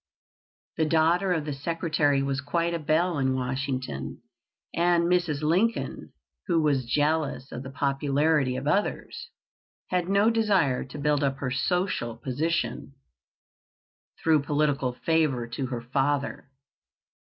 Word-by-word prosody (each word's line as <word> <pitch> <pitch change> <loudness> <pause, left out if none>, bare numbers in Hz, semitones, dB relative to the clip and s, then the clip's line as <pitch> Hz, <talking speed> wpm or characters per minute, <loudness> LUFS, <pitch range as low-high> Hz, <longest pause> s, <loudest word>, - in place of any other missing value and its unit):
The 160 - +2
daughter 165 +4 +2
of 160 -4 0
the 150 - -3
Secretary 150 -1 0
was 140 0 -1
quite 170 +4 -1
a 170 - -1
belle 160 +1 +1
in 130 -1 +1
Washington, 130 - -3 0.5
and 170 0 +3
Mrs. 170 -4 +1
Lincoln, 190 +9 0 0.4
who 170 -3 +2
was 140 -5 +1
jealous 150 -2 0
of 120 - -5
the 130 - -7
popularity 140 0 +1
of 130 +2 -4
others, 205 - -1 0.6
had 180 -1 0
no 200 +3 +4
desire 195 - +2
to 130 +3 -10
build 145 0 +1
up 135 -1 0
her 130 -2 -3
social 130 - -1
position 145 +1 -2 1.3
through 160 -3 +4
political 145 -3 0
favor 150 -8 +2
to 130 +2 -3
her 120 -2 -4
father. 135 +3 -1
150 Hz, 130 wpm, -27 LUFS, 135-170 Hz, 1.3 s, no